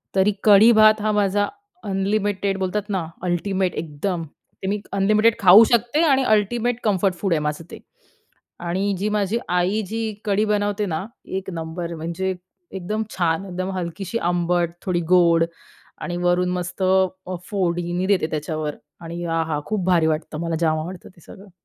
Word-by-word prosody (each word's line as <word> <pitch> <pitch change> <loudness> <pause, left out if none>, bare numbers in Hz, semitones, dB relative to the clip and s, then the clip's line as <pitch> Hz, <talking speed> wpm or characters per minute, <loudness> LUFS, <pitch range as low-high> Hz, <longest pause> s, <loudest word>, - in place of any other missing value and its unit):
तरी 195 +2 +3
कढी-भात 215 +1 +6
हा 215 0 +1
माझा 205 0 +1 0.4
अनलिमिटेड 200 0 -1
बोलतात 200 +2 -2
ना, 190 -4 -1 0.2
अल्टिमेट 185 +1 0
एकदम, 165 +3 -3 0.4
ते - - -2
मी 205 +1 -1
अनलिमिटेड 215 +3 +3
खाऊ 195 +2 +9
शकते 240 +6 +2
आणि 270 -4 +3
अल्टिमेट 235 +3 0
कम्फर्ट 195 -3 +1
फूड 190 0 -1
आहे 160 - +1
माझं 150 +2 -3
ते. - - -9 0.8
आणि 190 +4 -1
जी 205 +3 -1
माझी 210 +1 0
आई 180 +5 +1
जी 225 +2 -3 0.2
कढी 205 0 +1
बनवते 205 0 0
ना, 160 -1 -3 0.2
एक 190 0 -4
नंबर! 170 0 -5
म्हणजे 170 +4 -3 0.4
एकदम 195 +4 -3
छान! 170 0 0
एकदम 185 0 -4
हलकीशी 185 +5 -4
आंबट, 175 -1 0
थोडी 180 -2 0
गोड 170 -2 +5 0.6
आणि 175 - -3
वरून 175 +1 +1
मस्त 180 +1 -4
अ, 185 0 +1 0.2
फोडणी 175 -2 -1
देते 195 -5 +2
त्याच्यावर. 155 0 -3 0.2
आणि 170 +1 -6
आहा! 165 -2 -1
खूप 210 -1 -2
भारी 170 -3 +3
वाटतं. 155 0 -2
मला 165 -1 -2
जाम 160 -2 +2
आवडतं 175 +4 -7
ते - - -18
सगळं. 200 0 -13
185 Hz, 155 wpm, -22 LUFS, 170-205 Hz, 0.8 s, खाऊ